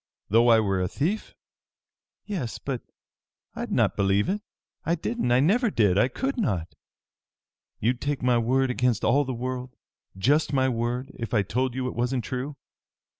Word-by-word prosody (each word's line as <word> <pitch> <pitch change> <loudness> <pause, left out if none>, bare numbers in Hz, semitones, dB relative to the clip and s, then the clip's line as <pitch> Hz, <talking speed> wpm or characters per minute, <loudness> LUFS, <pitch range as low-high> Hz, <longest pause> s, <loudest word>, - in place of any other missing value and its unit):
"Though 115 +3 +5
I 115 -1 +7
were 95 -3 +1
a 90 - +1
thief?" 175 - -2 0.9
"Yes! 175 - -3
But 130 -4 -4 0.7
I'd - - -5
not - - +2
believe 100 - +2
it! 205 +2 -1 0.4
I 165 +2 +1
didn't! 220 - -2
I 120 - +5
never 220 - +3
did! 105 - +3
I 115 - +4
could 265 - -3
not!" 90 - -1 1.1
"You'd 120 +4 0
take 145 -2 -2
my 125 -1 +3
word 130 +3 +2
against 125 -3 +1
all 145 +1 +3
the 130 - -3
world 125 +1 -4 0.4
just 145 +9 +2
my 130 -1 +3
word, 125 +2 -2
if 115 0 -3
I 105 - +4
told 125 +5 -1
you 130 -1 -1
it - - -4
wasn't 125 +1 0
true? 130 +3 -4
125 Hz, 170 wpm, -26 LUFS, 115-140 Hz, 1.1 s, I